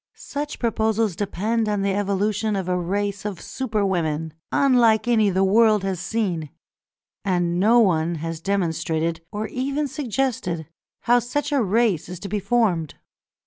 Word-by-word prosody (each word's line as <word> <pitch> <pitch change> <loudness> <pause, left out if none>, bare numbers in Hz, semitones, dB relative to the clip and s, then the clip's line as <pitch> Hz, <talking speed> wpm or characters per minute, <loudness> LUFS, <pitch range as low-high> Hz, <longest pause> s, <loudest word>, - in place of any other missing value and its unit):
Such 290 +1 -5
proposals 220 -4 0
depend 215 +4 -1
on 205 -2 0
the 200 -1 +1
evolution 205 +2 0
of 190 -2 -2
a 180 - +1
race 200 +3 -2
of 205 -4 -4
Superwomen 180 - -2 0.2
unlike 240 -5 +4
any 220 -4 +4
the 190 0 +2
world 215 +1 +4
has 190 -2 -2
seen, 180 -6 -2 0.7
and 175 -2 0
no 220 +5 +5
one 170 -6 +2
has 165 +1 -5
demonstrated, 165 -3 -1
or 210 +1 -3
even 275 +3 -1
suggested, 255 - -2 0.3
how 245 +1 +4
such 290 +5 -2
a 280 -3 +2
race 210 -5 +1
is 180 -1 -7
to 200 - -5
be 210 +2 -1
formed. 195 -8 +1
205 Hz, 145 wpm, -23 LUFS, 175-230 Hz, 0.7 s, no